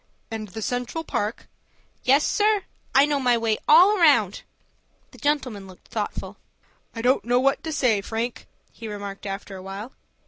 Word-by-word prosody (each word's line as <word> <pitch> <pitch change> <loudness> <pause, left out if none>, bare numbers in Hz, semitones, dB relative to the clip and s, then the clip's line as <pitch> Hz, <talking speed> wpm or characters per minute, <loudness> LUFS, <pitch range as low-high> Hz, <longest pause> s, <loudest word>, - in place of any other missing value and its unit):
"And 220 -1 -4
the 215 +3 -7
Central 245 +8 -3
Park?" 215 -7 -3 0.6
"Yes, 275 +4 +4
sir. 420 -2 +2 0.3
I 275 +1 +7
know 290 -1 0
my 245 -2 +3
way 225 -2 0
all 370 +7 +7
round." 250 - +4 0.7
The - - -16
gentleman 255 -9 -1
looked 185 -1 -16
thoughtful. - - -4 0.6
"I 225 - -5
don't 255 +2 +3
know 245 +1 +2
what 275 +1 +1
to 320 - -3
say, 250 -8 +2
Frank," 230 +4 -4 0.2
he 225 - -9
remarked 200 -1 -6
after 195 0 -6
a 185 - -8
while. 195 +6 -7
240 Hz, 165 wpm, -24 LUFS, 210-285 Hz, 0.7 s, I